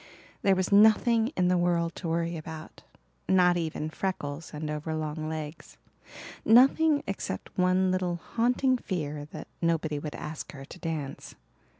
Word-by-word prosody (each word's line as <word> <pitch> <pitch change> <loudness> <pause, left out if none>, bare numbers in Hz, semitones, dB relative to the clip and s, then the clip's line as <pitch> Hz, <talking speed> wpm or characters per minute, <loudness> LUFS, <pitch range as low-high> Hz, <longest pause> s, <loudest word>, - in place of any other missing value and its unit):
There 195 -1 +4
was 185 +1 -1
nothing 220 +2 +5
in 180 - +3
the 180 0 +3
world 170 -1 +1
to 175 - -5
worry 170 +1 -1
about 160 0 -8 0.5
not 180 -2 +5
even 160 -2 -3
freckles 160 -5 -4
and 150 0 -5
over 150 +1 -3
long 155 0 -3
legs 155 0 -7 0.7
nothing 280 +6 +5
except 190 - -5
one 185 0 +3
little 185 -1 0
haunting 250 +8 +1
fear 150 -8 -4
that 150 - -9
nobody 160 -3 0
would 150 0 -6
ask 155 +1 -7
her 135 -1 -9
to 180 - -12
dance. 155 -5 -5
170 Hz, 145 wpm, -28 LUFS, 155-190 Hz, 0.7 s, nothing